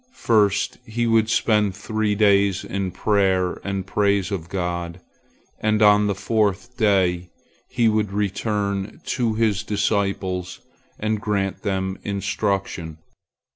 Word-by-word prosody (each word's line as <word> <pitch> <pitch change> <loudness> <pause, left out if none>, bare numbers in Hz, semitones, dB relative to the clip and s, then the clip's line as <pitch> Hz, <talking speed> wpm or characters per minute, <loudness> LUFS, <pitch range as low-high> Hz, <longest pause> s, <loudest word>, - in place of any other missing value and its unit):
First 105 -4 +2
he 120 0 -2
would 115 -1 +3
spend 105 -4 +2
three 105 +1 -1
days 100 -2 +3
in 100 -1 -3
prayer 95 -2 +1
and 95 -2 -3
praise 100 -1 +1
of 90 -4 -4
God, 85 -2 -3 0.6
and 110 0 +1
on 105 0 +5
the 100 - 0
fourth 105 +3 -1
day 95 -6 +1 0.4
he 120 -2 +2
would 105 -2 +1
return 100 0 -2
to 120 -3 0
his 110 -3 +1
disciples 100 -3 -1 0.4
and 110 0 -1
grant 100 -3 -1
them 95 -2 -2
instruction. 100 -5 -2
100 Hz, 120 wpm, -22 LUFS, 95-110 Hz, 0.6 s, on